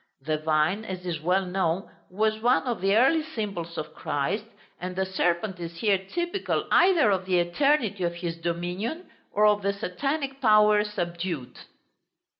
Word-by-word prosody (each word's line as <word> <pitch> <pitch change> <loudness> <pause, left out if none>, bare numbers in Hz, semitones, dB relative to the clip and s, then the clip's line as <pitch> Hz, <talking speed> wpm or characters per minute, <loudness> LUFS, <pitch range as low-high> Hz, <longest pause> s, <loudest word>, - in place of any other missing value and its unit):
The 155 +3 -2
vine, 155 +6 +1
as 185 -3 -6
is 165 -4 -3
well 185 +4 +1
known, 180 0 -1 0.2
was 215 +3 0
one 245 +2 +3
of 240 -6 -3
the 195 +1 +3
early 275 +7 +4
symbols 200 - -5
of 155 -1 -5
Christ, 175 +10 -2 0.3
and 180 0 -5
the 190 +1 0
serpent 185 0 -1
is 170 0 -7
here 200 0 +2
typical 345 - -2
either 340 - +5
of 190 -1 -1
the 185 -1 +2
eternity 205 +2 +1
of 170 0 -1
his 170 -1 -4
dominion, 175 - -4 0.2
or 210 +1 +3
of 210 -1 +4
the 200 0 0
Satanic 275 - -3
power 210 -2 +5
subdued. 170 -8 -4
190 Hz, 160 wpm, -26 LUFS, 175-220 Hz, 0.3 s, either